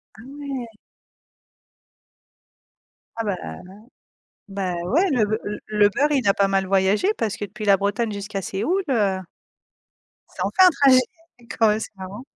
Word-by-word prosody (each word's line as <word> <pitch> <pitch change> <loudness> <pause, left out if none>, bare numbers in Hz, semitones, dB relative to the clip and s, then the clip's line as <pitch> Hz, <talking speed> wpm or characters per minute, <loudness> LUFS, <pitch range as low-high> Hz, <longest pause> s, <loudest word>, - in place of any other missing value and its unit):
Ah, 220 - -13
ouais! 275 -3 -6 2.5
Ah, 230 - -3
bah, 205 -3 -1
aha 80 0 -8 0.9
bah, 195 -2 -3
ouais, 330 - +2
le 240 -6 +2
beu 215 +1 -1
l 210 0 -4
le 210 -1 +3
beurre, 290 +8 +1
il 265 -7 +1
a 195 - +4
pas 200 - +2
mal 195 -1 +1
voyagé, 195 - +2
parce 220 -2 -1
que 205 - -5
depuis 215 +3 -8
la 200 -1 +5
Bretagne 205 +3 -1
jusqu'à 200 0 -5
Séoul, 320 - -1
heu 205 -6 +1 1.2
ça - - -3
en - - 0
fait 375 - +6
un - - +7
trajet, 275 -4 +5 0.6
quand 225 - +5
même, 210 - +1
c'est 220 - -8
marrant. 195 +4 -8
210 Hz, 165 wpm, -22 LUFS, 195-255 Hz, 2.5 s, un